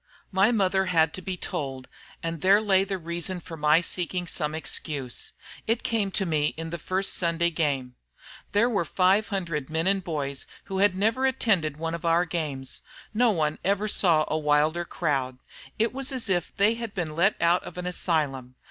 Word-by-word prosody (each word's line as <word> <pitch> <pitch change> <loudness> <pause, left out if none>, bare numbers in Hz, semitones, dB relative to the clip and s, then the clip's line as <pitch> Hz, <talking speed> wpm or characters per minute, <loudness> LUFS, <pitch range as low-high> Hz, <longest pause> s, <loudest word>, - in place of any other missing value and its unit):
"My 195 +4 +4
mother 190 -3 +2
had 160 -3 +3
to 185 - -5
be 185 -1 -4
told, 135 -6 -4 0.4
and 165 -2 -3
there 195 +2 +6
lay 195 -3 +3
the 195 0 -3
reason 170 +2 -3
of 165 -3 -8
my 150 +2 +5
seeking 180 0 -1
for - - -5
some 150 +1 -1
excuse. 145 -5 -3 0.3
It 225 +1 +1
came 225 -6 0
to 195 0 0
me 150 -3 0
in 165 0 -5
the 170 - -4
first 190 +5 0
Sunday 170 -1 +1
game. 140 -6 -1 0.6
There 205 +4 +3
were 210 -7 +1
five 190 +6 +2
hundred 165 -8 -3
men 160 +1 -1
and 195 0 +2
boys 140 -5 -3 0.2
who 190 -1 -4
had 200 -1 +4
never 225 +7 +2
attended 195 - +1
one 165 +1 -3
of 170 - -5
our 170 +1 +3
games. 150 -6 -4 0.3
No 240 +2 +4
one 155 -6 0
ever 200 +2 +1
saw 165 -7 +3
a 155 - -1
wilder 155 +3 +2
crowd. 135 -7 -1 0.4
It 225 +2 +1
was 270 +1 -2
as 255 -5 -1
if 175 -3 0
they 205 +3 +4
had 230 -2 -6
been 165 -5 -3
let 190 +6 +3
out 170 +1 +3
of - - -10
an 180 - -4
asylum. 145 -8 -1
175 Hz, 190 wpm, -26 LUFS, 155-195 Hz, 0.6 s, there